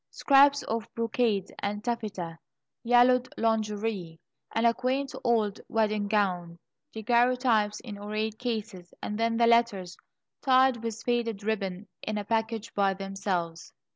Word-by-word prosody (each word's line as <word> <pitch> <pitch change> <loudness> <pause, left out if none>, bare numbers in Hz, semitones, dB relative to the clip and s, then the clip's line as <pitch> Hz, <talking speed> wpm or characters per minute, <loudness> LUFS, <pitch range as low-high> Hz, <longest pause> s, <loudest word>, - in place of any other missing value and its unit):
Scraps 280 0 +4
of 225 0 -3
brocade 225 -4 0
and 205 +1 -3
taffeta, 210 -8 -4 0.4
yellowed 245 +1 +4
lingerie, 210 -6 -1 0.3
and 225 +1 0
a 230 - +5
quaint 260 +3 -2
old 220 -4 +1
wedding 215 -2 0
gown, 180 -5 0 0.3
daguerreotypes 235 -2 +2
in 210 -5 -8
ornate 215 +1 -3
cases, 215 -7 -5
and 210 +1 -3
then 230 0 +1
the 235 - +4
letters, 230 -6 +2 0.5
tied 260 -3 +4
with 230 -1 -4
faded 230 -4 -1
ribbon, 200 -2 -3
in 215 0 -3
a 205 - -3
package 225 0 -2
by 195 -1 +2
themselves. 190 -4 -4
220 Hz, 130 wpm, -28 LUFS, 200-235 Hz, 0.5 s, a